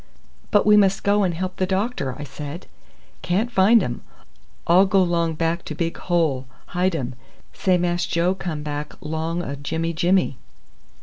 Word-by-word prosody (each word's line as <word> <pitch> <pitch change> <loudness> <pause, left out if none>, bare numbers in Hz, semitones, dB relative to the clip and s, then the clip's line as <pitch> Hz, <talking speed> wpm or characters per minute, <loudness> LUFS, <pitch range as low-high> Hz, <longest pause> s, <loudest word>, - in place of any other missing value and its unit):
"But 205 - +3
we 210 0 +6
must 195 -1 +3
go 205 +1 +3
and 185 -3 +2
help 185 +2 -4
the 185 - 0
doctor," 190 - -1
I 145 - -6
said. 150 +4 -7 0.6
"Can't 205 +7 0
find 210 +1 +5
um. 120 - -4 0.6
All 185 +3 +5
go 190 0 +4
long 170 -2 0
back 165 +2 -1
to 155 - -5
big 165 +1 -2
hole. 155 -8 0 0.3
Hidum. 170 -8 0 0.4
Say 185 -1 +2
Mass 175 0 0
Joe 170 +2 +1
come 170 -6 -5
back 150 0 -4
long 160 +3 -3
o' 140 - -4
Jimmy 160 +4 -3
Jimmy." 175 -4 +1
175 Hz, 165 wpm, -22 LUFS, 155-190 Hz, 0.6 s, we